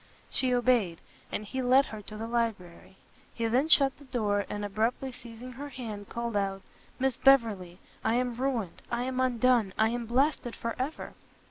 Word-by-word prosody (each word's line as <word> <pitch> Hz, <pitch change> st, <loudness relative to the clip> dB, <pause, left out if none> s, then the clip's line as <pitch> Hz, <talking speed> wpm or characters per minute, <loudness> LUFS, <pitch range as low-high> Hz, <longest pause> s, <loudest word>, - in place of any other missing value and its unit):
She 255 Hz, -1 st, +2 dB
obeyed, 240 Hz, -9 st, +2 dB, 0.3 s
and 215 Hz, -, -3 dB
he 260 Hz, +5 st, -3 dB
led 260 Hz, +2 st, +5 dB
her 215 Hz, -1 st, -8 dB
to 210 Hz, +1 st, -9 dB
the 225 Hz, -, -4 dB
library. 215 Hz, -6 st, -3 dB, 0.4 s
He 230 Hz, -, -1 dB
then 250 Hz, +6 st, +2 dB
shut 275 Hz, -4 st, +5 dB
the 285 Hz, -, -14 dB
door, 210 Hz, -6 st, 0 dB
and 205 Hz, 0 st, -3 dB
abruptly 225 Hz, +6 st, -1 dB
seizing 245 Hz, 0 st, -9 dB
her 280 Hz, +4 st, -7 dB
hand, 220 Hz, -6 st, -7 dB
called 235 Hz, -1 st, -3 dB
out, 195 Hz, -1 st, -1 dB, 0.3 s
"Miss 265 Hz, -2 st, 0 dB
Beverley, 215 Hz, -10 st, +3 dB, 0.3 s
I 225 Hz, -, +2 dB
am 250 Hz, 0 st, +1 dB
ruined! 240 Hz, -7 st, -2 dB
I 240 Hz, 0 st, -1 dB
am 255 Hz, 0 st, -2 dB
undone! 245 Hz, -5 st, +3 dB
I 220 Hz, 0 st, +4 dB
am 235 Hz, 0 st, -3 dB
blasted 255 Hz, 0 st, +1 dB
for 230 Hz, 0 st, -3 dB
ever!" 275 Hz, +5 st, -4 dB
235 Hz, 175 wpm, -29 LUFS, 215-255 Hz, 0.4 s, led